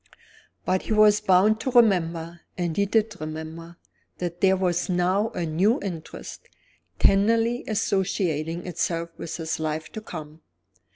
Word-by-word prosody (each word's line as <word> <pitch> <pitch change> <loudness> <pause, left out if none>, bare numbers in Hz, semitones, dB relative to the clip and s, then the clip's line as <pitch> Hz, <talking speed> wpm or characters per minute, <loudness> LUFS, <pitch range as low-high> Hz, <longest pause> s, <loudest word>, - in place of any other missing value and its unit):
But 185 0 +1
he - - -2
was 210 -1 +5
bound 210 +2 +4
to 260 - -2
remember 175 -8 +2 0.2
and 175 -3 -2
he 200 0 +1
did 215 -2 0
remember 160 +2 -7 0.4
that 175 -1 -5
there 190 -1 +4
was 180 0 0
now 185 +4 +1
a 170 - -3
new 185 +9 +2
interest, 170 -5 -8 0.5
tenderly 230 +4 +3
associating 180 -6 -1
itself 170 -1 -2
with 165 - -5
his 160 -1 -3
life 155 0 -3
to 220 - -7
come. 160 -6 -9
180 Hz, 135 wpm, -25 LUFS, 165-210 Hz, 0.5 s, was